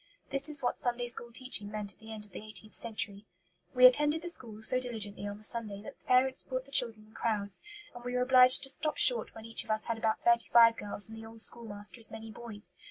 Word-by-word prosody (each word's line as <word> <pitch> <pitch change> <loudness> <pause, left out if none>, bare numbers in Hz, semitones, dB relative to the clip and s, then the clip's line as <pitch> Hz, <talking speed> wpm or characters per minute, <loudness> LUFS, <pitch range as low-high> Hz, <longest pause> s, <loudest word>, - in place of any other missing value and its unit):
This 275 +2 0
is 295 -3 -2
what 245 - -2
Sunday 245 0 -2
school 240 0 0
teaching 230 -4 0
meant 210 -1 -4
at - - -35
the 220 0 -12
end 215 -1 -8
of 205 - -22
the 210 - -9
eighteenth 215 0 -4
century: 215 -3 -4 0.5
"We 255 0 +6
attended 295 +5 +4
the 350 - -1
school 220 -9 0
so 255 +3 +3
diligently 215 -5 -3
on 205 0 -7
the 215 - -18
Sunday 210 -2 -2
that 280 - -10
the - - -38
parents 260 +1 +2
brought 255 0 -5
the 275 - -19
children 225 -5 0
in - - -23
crowds, 205 -4 -2 0.3
and 245 0 -11
we 245 0 -5
were 250 - +1
obliged 255 +1 +6
to 270 - -2
stop 305 +1 -4
short 240 -5 +4
when 225 0 -11
each 225 0 -1
of - - -20
us 215 0 +1
had 230 -1 -4
about 220 -1 -1
thirty 235 0 +2
five 230 -1 +6
girls 205 -1 -2
and 225 0 -11
the 225 - -10
old 225 0 -5
schoolmaster 210 -1 +1
as 225 - -4
many 220 0 -10
boys. 210 -5 -7
230 Hz, 250 wpm, -30 LUFS, 215-250 Hz, 0.5 s, We